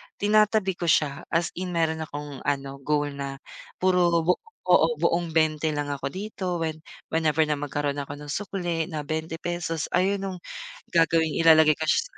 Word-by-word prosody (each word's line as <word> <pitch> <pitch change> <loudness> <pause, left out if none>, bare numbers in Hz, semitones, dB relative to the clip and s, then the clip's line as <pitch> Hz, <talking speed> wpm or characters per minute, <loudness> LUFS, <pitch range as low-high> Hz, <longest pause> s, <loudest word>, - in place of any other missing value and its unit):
tinatabi 210 -2 +2
ko 170 - -2
siya 150 -3 +1
as 165 0 0
in 180 -1 -4
meron 160 -1 0
akong 145 -2 -7
ano, 140 -1 -2
goal 145 +1 0
na 140 -1 -5 0.4
puro 175 -2 +3
bu 180 - +4 0.4
oo 475 - +4
buong 170 -1 +1
20 155 -1 +2
lang 145 -1 -2
ako 140 -1 -3
dito 185 -2 -4
when 160 -1 -2 0.3
whenever 160 -1 0
na 150 - +1
magkaroon 145 0 -2
ako 145 +1 -8
ng 150 - -9
sukle 175 -3 -2
na 155 - -3
₱20, 165 0 -3
ayun 195 +3 +2
nung 190 -1 -4 0.5
gagawing 165 -1 +3
ilalagay 160 -1 +7
ko 160 +1 -4
siya - - +1
sa - - -26
ilagay - - -18
160 Hz, 175 wpm, -26 LUFS, 150-180 Hz, 0.5 s, ilalagay